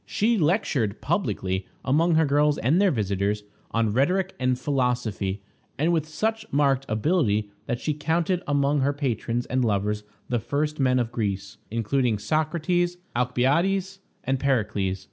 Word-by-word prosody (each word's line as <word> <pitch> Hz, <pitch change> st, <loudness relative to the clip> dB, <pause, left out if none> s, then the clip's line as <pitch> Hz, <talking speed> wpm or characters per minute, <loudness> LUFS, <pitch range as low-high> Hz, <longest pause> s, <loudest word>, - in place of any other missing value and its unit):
She 230 Hz, +3 st, +2 dB
lectured 155 Hz, -, +1 dB
publicly, 95 Hz, 0 st, -1 dB, 0.2 s
among 160 Hz, +5 st, +3 dB
her 160 Hz, 0 st, +4 dB
girls 145 Hz, +1 st, +3 dB
and 150 Hz, -, +2 dB
their 200 Hz, -, +5 dB
visitors, 105 Hz, -, -1 dB, 0.3 s
on 115 Hz, -2 st, 0 dB
rhetoric 180 Hz, -, +1 dB
and 125 Hz, -1 st, +1 dB
philosophy, 125 Hz, -7 st, -1 dB, 0.3 s
and 160 Hz, +4 st, +2 dB
with 160 Hz, -2 st, 0 dB
such 220 Hz, +8 st, -1 dB
marked 135 Hz, -2 st, +2 dB
ability 110 Hz, -, +1 dB, 0.2 s
that 120 Hz, -, -1 dB
she 155 Hz, -, -1 dB
counted 165 Hz, +4 st, 0 dB
among 145 Hz, 0 st, +2 dB
her 140 Hz, +2 st, +2 dB
patrons 120 Hz, -4 st, -2 dB
and 130 Hz, 0 st, 0 dB
lovers 105 Hz, -1 st, 0 dB, 0.2 s
the 120 Hz, -2 st, 0 dB
first 150 Hz, +6 st, -2 dB
men 130 Hz, -1 st, +3 dB
of 120 Hz, -2 st, 0 dB
Greece, 100 Hz, -5 st, -3 dB
including 115 Hz, +1 st, 0 dB
Socrates, 165 Hz, -, 0 dB, 0.2 s
Alcibiades, 165 Hz, +11 st, +1 dB, 0.2 s
and 135 Hz, 0 st, 0 dB
Pericles. 105 Hz, -8 st, 0 dB
135 Hz, 145 wpm, -25 LUFS, 110-160 Hz, 0.3 s, their